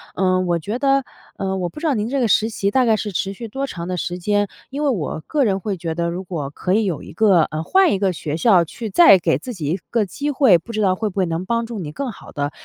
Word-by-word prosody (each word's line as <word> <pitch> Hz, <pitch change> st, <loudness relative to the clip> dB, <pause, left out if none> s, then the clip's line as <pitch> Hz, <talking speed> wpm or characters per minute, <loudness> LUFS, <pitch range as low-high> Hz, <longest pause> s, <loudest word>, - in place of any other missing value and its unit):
嗯， 185 Hz, -1 st, +1 dB
我 170 Hz, -1 st, +1 dB
觉 210 Hz, +9 st, -4 dB
得 275 Hz, 0 st, +2 dB, 0.3 s
嗯， 190 Hz, -1 st, -2 dB
我 175 Hz, -1 st, -2 dB
不 300 Hz, -, -10 dB
知 325 Hz, -, -1 dB
道 290 Hz, -, +2 dB
您 215 Hz, 0 st, -1 dB
这 275 Hz, +1 st, 0 dB
个 245 Hz, -, +2 dB
实 220 Hz, +1 st, +3 dB
习 200 Hz, -2 st, -1 dB
大 255 Hz, +3 st, +3 dB
概 225 Hz, -2 st, +4 dB
是 210 Hz, -1 st, -3 dB
持 195 Hz, +1 st, -2 dB
续 230 Hz, +4 st, -7 dB
多 270 Hz, +6 st, -3 dB
长 170 Hz, -7 st, -6 dB
的 185 Hz, -, -3 dB
时 175 Hz, +1 st, -3 dB
间， 205 Hz, +3 st, +1 dB, 0.2 s
因 285 Hz, +3 st, -4 dB
为 290 Hz, -, +2 dB
我 165 Hz, -, -2 dB
个 290 Hz, -3 st, +1 dB
人 195 Hz, -4 st, +1 dB
会 195 Hz, 0 st, -3 dB
觉 165 Hz, -1 st, -4 dB
得 170 Hz, 0 st, -1 dB
如 175 Hz, +2 st, -4 dB
果 160 Hz, -7 st, -4 dB
可 180 Hz, +5 st, -2 dB
以 215 Hz, +1 st, +2 dB
有 175 Hz, -7 st, -2 dB
一 -, -, -10 dB
个 190 Hz, -1 st, +4 dB
呃， 155 Hz, +1 st, -3 dB
换 380 Hz, -, +4 dB
一 190 Hz, -, -1 dB
个 195 Hz, -2 st, +1 dB
学 155 Hz, -1 st, -4 dB
校 190 Hz, -4 st, +5 dB
去 220 Hz, +7 st, -7 dB
再 205 Hz, -, +7 dB
给 -, -, +1 dB
自 255 Hz, -, -7 dB
己 170 Hz, -8 st, -6 dB
一 180 Hz, -, 0 dB
个 230 Hz, -3 st, +1 dB
机 285 Hz, -, -3 dB
会， 260 Hz, -10 st, +5 dB
不 170 Hz, +8 st, -10 dB
知 215 Hz, -1 st, -2 dB
道 185 Hz, -2 st, +3 dB
会 215 Hz, +2 st, -2 dB
不 200 Hz, -, -13 dB
会 190 Hz, -, +2 dB
能 165 Hz, +1 st, -3 dB
帮 230 Hz, +2 st, 0 dB
助 230 Hz, -2 st, -6 dB
你 155 Hz, -5 st, -5 dB
更 260 Hz, -, -4 dB
好 -, -, -13 dB
地 145 Hz, 0 st, -2 dB
195 Hz, 320 characters per minute, -20 LUFS, 175-235 Hz, 0.3 s, 再